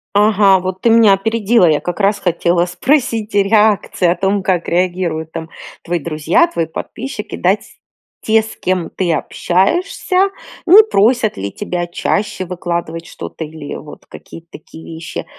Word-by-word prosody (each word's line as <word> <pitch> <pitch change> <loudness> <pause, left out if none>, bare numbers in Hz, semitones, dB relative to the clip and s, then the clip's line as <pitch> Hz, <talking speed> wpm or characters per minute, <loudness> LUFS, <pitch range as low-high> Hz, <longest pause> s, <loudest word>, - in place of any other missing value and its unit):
Ага, 205 -2 +4
вот 185 0 -5
ты 235 - +3
меня 225 -3 +6
опередила. 220 +1 +2
Я 150 - +2
как 175 +3 -5
раз 200 +1 +2
хотела 175 0 +1
спросить 230 +2 -1
реакции 205 -2 +2
о 170 - +2
том, 195 +2 0
как 180 -3 0
реагируют, 175 -3 -1
там, 165 0 -7 0.3
твои 175 0 -2
друзья, 170 - +1
твои 170 - -2
подписчики, 220 +7 -7
дать 190 +4 -1 0.4
те, 220 0 +3
с 225 - -10
кем 180 -2 -2
ты 175 -3 -1
общаешься, 350 - 0 0.4
не 410 +5 +9
просят 220 +2 +2
ли 100 +1 -4
тебя 175 - -4
чаще 190 +2 -2
выкладывать 170 -2 -4
что-то 160 - -7
или 150 -1 -8
вот 150 -1 -11
какие-то 165 0 -13
такие 160 +1 -13
вещи. 165 +2 -7
185 Hz, 150 wpm, -16 LUFS, 170-215 Hz, 0.4 s, не